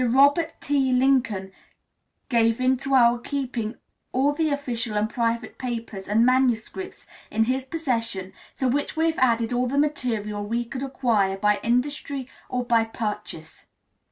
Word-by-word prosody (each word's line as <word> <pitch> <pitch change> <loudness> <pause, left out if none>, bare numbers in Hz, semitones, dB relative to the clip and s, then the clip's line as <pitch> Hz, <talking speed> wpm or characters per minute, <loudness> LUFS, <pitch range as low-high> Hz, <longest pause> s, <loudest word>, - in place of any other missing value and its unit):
Robert 285 +7 +3
T. 275 -2 +1
Lincoln 250 -7 +2 0.8
gave 230 -3 +2
into 260 +1 +1
our 240 -1 +5
keeping 245 -4 -3 0.4
all 275 +3 +2
the 315 +1 0
official 240 -6 -2
and 210 +1 +2
private 230 +1 -2
papers 230 -6 -5
and 220 +3 +4
manuscripts 255 +7 0 0.2
in 220 +1 +2
his 255 +3 -1
possession, 230 - -2 0.2
to 260 - +1
which 285 +5 -1
we 320 - +3
have 325 -1 0
added 235 -2 +2
all 250 +1 +1
the 275 +3 -2
material 225 -8 -1
we 235 +3 -1
could 255 +2 -6
acquire 230 -8 +1
by 210 +1 +2
industry 265 +2 -1 0.2
or 250 -1 -1
by 230 -2 +3
purchase. 210 -8 -6
245 Hz, 145 wpm, -25 LUFS, 225-270 Hz, 0.8 s, our